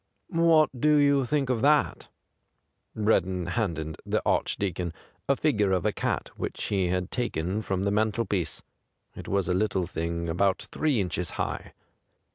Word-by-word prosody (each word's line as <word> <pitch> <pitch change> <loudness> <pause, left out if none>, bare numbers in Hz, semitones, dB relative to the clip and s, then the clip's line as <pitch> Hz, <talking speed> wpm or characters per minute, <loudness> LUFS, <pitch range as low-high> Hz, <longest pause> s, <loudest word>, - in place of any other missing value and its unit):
' - - -48
What 165 -4 +4
do 150 0 +5
you 140 -2 +4
think 135 0 0
of 115 -3 0
that 150 +2 +2 0.4
?' - - -29
Breddon 95 -5 +1
handed 80 -7 -2
the - - 0
Archdeacon 90 -3 0 0.4
a 140 - +5
figure 105 -10 +1
of 90 -2 0
a - - +3
cat - - -2
which - - -4
he 95 -3 0
had 90 +1 -1
taken 105 -5 -1
from 95 -3 -2
the 100 - +1
mantelpiece. 105 -3 -1 0.5
It - - -9
was 100 -3 0
a 90 - +1
little 95 -1 +1
thing 85 0 -3
about 95 +3 +1
three 150 -7 +1
inches 90 -3 -1
high. - - -3
100 Hz, 160 wpm, -27 LUFS, 90-125 Hz, 0.5 s, do